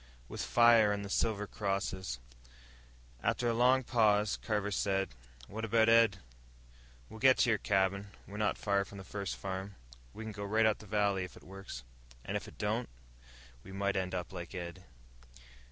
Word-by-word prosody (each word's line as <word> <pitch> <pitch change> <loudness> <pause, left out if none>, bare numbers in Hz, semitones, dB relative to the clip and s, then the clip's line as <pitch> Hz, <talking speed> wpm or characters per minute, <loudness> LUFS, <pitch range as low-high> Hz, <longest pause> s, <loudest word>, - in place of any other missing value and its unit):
"With - - -6
fire, 115 -3 +5
and 100 0 -2
the 100 - -7
silver 105 -1 +1
crosses." 95 - -2 1.0
After 120 - 0
a 115 - +2
long 125 +3 +4
pause, 105 -4 +3
Carver 105 -2 -2
said, 95 -1 0 0.4
"What 110 +2 -6
about 115 0 +3
Ed?" 115 -4 +5 0.9
"We'll 110 - -11
get 130 +1 +6
to - - +3
your 110 - +2
cabin. 100 0 +1 0.2
We're 100 - -8
not 105 -2 +1
far 100 -1 +1
from 100 - -11
the 95 - -8
first 100 0 -4
farm. 95 +1 -5 0.4
We 110 - -8
can 110 - -5
go 100 -1 -6
right 110 +2 +2
up 110 0 +2
the 110 - -12
valley. 100 -2 +1
If 90 - -9
it - - -15
works." 95 -10 -9 0.4
"And - - -3
if - - -3
it - - -13
don't?" - - -1 0.7
"We 95 - -11
might 100 +1 -1
end 95 -1 -1
up 90 +1 -4
like 90 +1 -7
Ed." 90 0 -6
100 Hz, 180 wpm, -33 LUFS, 95-110 Hz, 1.0 s, get